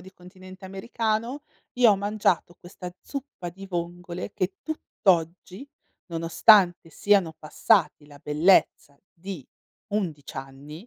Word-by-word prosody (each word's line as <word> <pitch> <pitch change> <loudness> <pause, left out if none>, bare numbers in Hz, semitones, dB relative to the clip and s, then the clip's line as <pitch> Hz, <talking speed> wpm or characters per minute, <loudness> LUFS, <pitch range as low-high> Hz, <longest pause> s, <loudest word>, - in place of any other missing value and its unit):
di 190 - -14
continente 185 +1 -14
americano, 225 +6 -3 0.3
io 245 -3 +5
ho 200 - +3
mangiato 200 -4 0
questa 180 0 -9
zuppa 275 -10 -7
di 195 +3 -10
vongole 175 0 -5
che 185 +1 -2
tutt'oggi, 185 - -1 0.4
nonostante 175 +2 +4
siano 195 -3 +2
passati 155 -2 +1
la 145 -1 -15
bellezza 150 -2 +2 0.2
di 180 -4 -8 0.5
11 165 -9 -3
anni, 140 - -9
180 Hz, 110 wpm, -25 LUFS, 165-205 Hz, 0.5 s, io